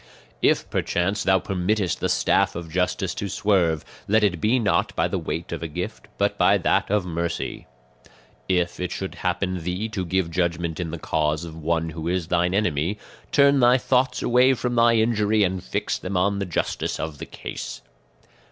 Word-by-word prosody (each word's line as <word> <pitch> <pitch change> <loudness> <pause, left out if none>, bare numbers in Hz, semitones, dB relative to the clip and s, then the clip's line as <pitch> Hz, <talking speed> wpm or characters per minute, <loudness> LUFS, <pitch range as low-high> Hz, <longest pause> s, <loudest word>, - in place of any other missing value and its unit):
"If - - +2
perchance 95 +4 0
thou 95 -1 +4
permittest 95 0 -1
the - - -1
staff - - +2
of 85 -1 -6
justice 90 +2 0
to 100 - -4
swerve, 90 -7 +1 0.2
let 110 +2 +3
it 90 -5 +1
be 115 +4 +3
not 110 -5 +1
by - - +2
the - - -2
weight 85 +1 -4
of 85 - -4
a 85 - -3
gift, 75 - -6
but - - 0
by - - +5
that - - +1
of 105 -2 +1
mercy. 85 -1 -3 0.8
"If 90 -2 +1
it 90 - -3
should 95 - -4
happen 90 +1 -1
to - - -6
thee 90 +6 -3
to 100 -4 -3
give 90 -1 -1
judgment 85 -1 -1
in 85 -2 -2
the 85 - -5
cause 75 +1 -1
of 80 -1 -9
one 80 +1 -1
who 80 +1 -5
is 90 -1 -1
thine 90 +1 +1
enemy, 90 -1 0 0.3
turn 140 -1 +5
thy 125 0 +6
thoughts 130 0 +1
away 125 +2 +4
from 125 0 -2
thy 115 0 +4
injury 110 -2 +2
and 95 -1 -1
fix - - -2
them 95 0 -3
on 100 +2 +1
the 100 - -2
justice 85 - -2
of 80 -2 -5
the - - -7
case. - - -7
90 Hz, 190 wpm, -24 LUFS, 85-105 Hz, 0.8 s, thy